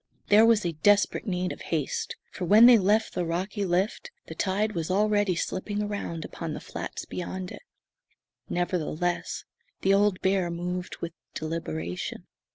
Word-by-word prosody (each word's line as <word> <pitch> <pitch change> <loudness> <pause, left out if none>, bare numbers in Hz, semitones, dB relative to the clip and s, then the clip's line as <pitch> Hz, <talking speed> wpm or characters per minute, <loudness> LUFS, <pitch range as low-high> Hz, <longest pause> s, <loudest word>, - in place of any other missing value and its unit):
There 215 +2 +7
was 230 -2 +5 0.2
desperate 205 +3 +3
need 180 -1 -1
of - - -8
haste, 155 -5 -2 0.2
for 180 - -4
when 215 +6 +8
they 240 -2 +9
left 210 +3 +2
the 180 - -1
rocky 190 +5 -2
lift 185 +3 0 0.2
the - - -8
tide 200 +5 0
was 165 -2 -3
already 205 -1 +2
slipping 205 +4 -2
around 200 -6 -4
upon 165 -3 -5
the - - -5
flats - - -6
beyond 180 +1 -5
it. - - -9 0.9
Nevertheless, 175 -1 -1 0.4
the 195 - +4
old 200 -1 +3
bear 190 -2 +2
moved 180 +1 -4
with 170 -1 -4 0.2
deliberation. 90 - -4
185 Hz, 150 wpm, -27 LUFS, 170-205 Hz, 0.9 s, they